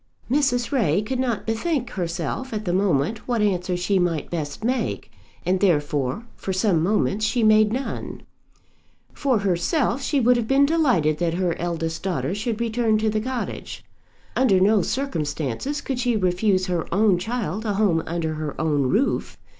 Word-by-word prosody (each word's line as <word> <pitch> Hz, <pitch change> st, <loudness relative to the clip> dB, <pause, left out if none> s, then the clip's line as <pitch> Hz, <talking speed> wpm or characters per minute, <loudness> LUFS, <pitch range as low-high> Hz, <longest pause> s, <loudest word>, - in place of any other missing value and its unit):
Mrs. 265 Hz, -4 st, +1 dB
Ray 210 Hz, -, +2 dB
could 255 Hz, +4 st, -3 dB
not 245 Hz, -5 st, -1 dB
bethink 250 Hz, +3 st, -1 dB
herself 175 Hz, -, -3 dB
at 215 Hz, 0 st, -3 dB
the 175 Hz, -, 0 dB
moment 190 Hz, +1 st, 0 dB
what 240 Hz, -2 st, 0 dB
answer 185 Hz, -3 st, 0 dB
she 190 Hz, +2 st, +1 dB
might 170 Hz, -4 st, -1 dB
best 155 Hz, +2 st, -4 dB
make, 250 Hz, +2 st, -2 dB, 0.3 s
and 185 Hz, +1 st, +1 dB
therefore 150 Hz, -, 0 dB
for 190 Hz, -, -4 dB
some 190 Hz, -3 st, +2 dB
moments 205 Hz, +3 st, +1 dB
she 230 Hz, +2 st, +1 dB
made 215 Hz, 0 st, +5 dB
none. 260 Hz, +3 st, -4 dB, 0.9 s
For 270 Hz, -4 st, +1 dB
herself 205 Hz, -, 0 dB
she 285 Hz, +1 st, +1 dB
would 250 Hz, 0 st, +4 dB
have 230 Hz, -2 st, -2 dB
been 275 Hz, +2 st, +4 dB
delighted 250 Hz, -, +2 dB
that 170 Hz, -1 st, 0 dB
her 180 Hz, -2 st, 0 dB
eldest 165 Hz, -1 st, -3 dB
daughter 185 Hz, -1 st, -2 dB
should 220 Hz, +2 st, -2 dB
return 230 Hz, -1 st, +1 dB
to 215 Hz, 0 st, +1 dB
the 215 Hz, 0 st, 0 dB
cottage. 255 Hz, +1 st, -5 dB, 0.5 s
Under 220 Hz, -8 st, +4 dB
no 205 Hz, +2 st, +4 dB
circumstances 165 Hz, -, -2 dB
could 265 Hz, -3 st, -3 dB
she 245 Hz, -2 st, +1 dB
refuse 185 Hz, 0 st, +1 dB
her 175 Hz, -3 st, -2 dB
own 195 Hz, -1 st, +3 dB
child 220 Hz, -1 st, -3 dB
a 210 Hz, -3 st, -1 dB
home 195 Hz, -6 st, +2 dB
under 160 Hz, -1 st, -2 dB
her 155 Hz, -1 st, -5 dB
own 145 Hz, -4 st, +1 dB
roof. 245 Hz, -, 0 dB
205 Hz, 165 wpm, -23 LUFS, 175-240 Hz, 0.9 s, made